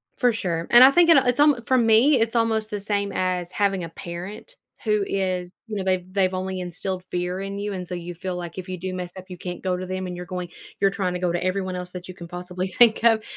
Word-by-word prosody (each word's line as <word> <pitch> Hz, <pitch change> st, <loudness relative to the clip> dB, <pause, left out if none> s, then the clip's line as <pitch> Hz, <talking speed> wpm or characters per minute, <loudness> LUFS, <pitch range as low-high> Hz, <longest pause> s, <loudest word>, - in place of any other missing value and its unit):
For 245 Hz, -2 st, +2 dB
sure, 170 Hz, -6 st, -2 dB
and 240 Hz, +1 st, +10 dB
I 265 Hz, -, +10 dB
think 340 Hz, +3 st, +4 dB
and 325 Hz, -, +8 dB
a 260 Hz, -, -2 dB
it's 245 Hz, +3 st, +1 dB
alm 290 Hz, -4 st, +5 dB
for 260 Hz, -, +4 dB
me, 235 Hz, +4 st, +5 dB
it's 225 Hz, +1 st, 0 dB
almost 220 Hz, -1 st, +1 dB
the 205 Hz, -, -2 dB
same 200 Hz, 0 st, -1 dB
as 180 Hz, -1 st, -1 dB
having 195 Hz, -2 st, 0 dB
a 165 Hz, -, -5 dB
parent 180 Hz, -, -8 dB, 0.3 s
who 210 Hz, -2 st, +2 dB
is, 185 Hz, -2 st, -2 dB, 0.2 s
you 215 Hz, -, -5 dB
know, 195 Hz, -, -2 dB
they've 185 Hz, -1 st, -1 dB
they've 190 Hz, -1 st, +1 dB
only 185 Hz, 0 st, -3 dB
instilled 180 Hz, +1 st, -4 dB
fear 180 Hz, +1 st, -2 dB
in 195 Hz, +1 st, -5 dB
you, 205 Hz, 0 st, -3 dB
and 180 Hz, -2 st, -5 dB
so 180 Hz, -, -5 dB
you 175 Hz, 0 st, -6 dB
feel 180 Hz, +1 st, -4 dB
like 175 Hz, 0 st, -6 dB
if 185 Hz, 0 st, -6 dB
you 185 Hz, -, -4 dB
do 185 Hz, 0 st, -4 dB
mess 180 Hz, -1 st, -5 dB
up, 185 Hz, -, -9 dB
you 180 Hz, -, -8 dB
can't 180 Hz, -1 st, -6 dB
go 185 Hz, -1 st, 0 dB
to 185 Hz, -, -5 dB
them, 185 Hz, 0 st, -4 dB
and 180 Hz, -, -5 dB
you're 180 Hz, -, -6 dB
going 180 Hz, 0 st, -5 dB, 0.3 s
you're 195 Hz, -, +4 dB
trying 190 Hz, -2 st, -2 dB
to 180 Hz, -, -3 dB
go 180 Hz, -1 st, 0 dB
to 175 Hz, +1 st, -1 dB
everyone 185 Hz, 0 st, -1 dB
else 180 Hz, 0 st, -6 dB
that 180 Hz, 0 st, -8 dB
you 185 Hz, -, -9 dB
can 170 Hz, -, -9 dB
possibly 180 Hz, +1 st, -4 dB
think 220 Hz, +4 st, +4 dB
of 225 Hz, -2 st, +4 dB
185 Hz, 275 wpm, -24 LUFS, 180-210 Hz, 0.3 s, and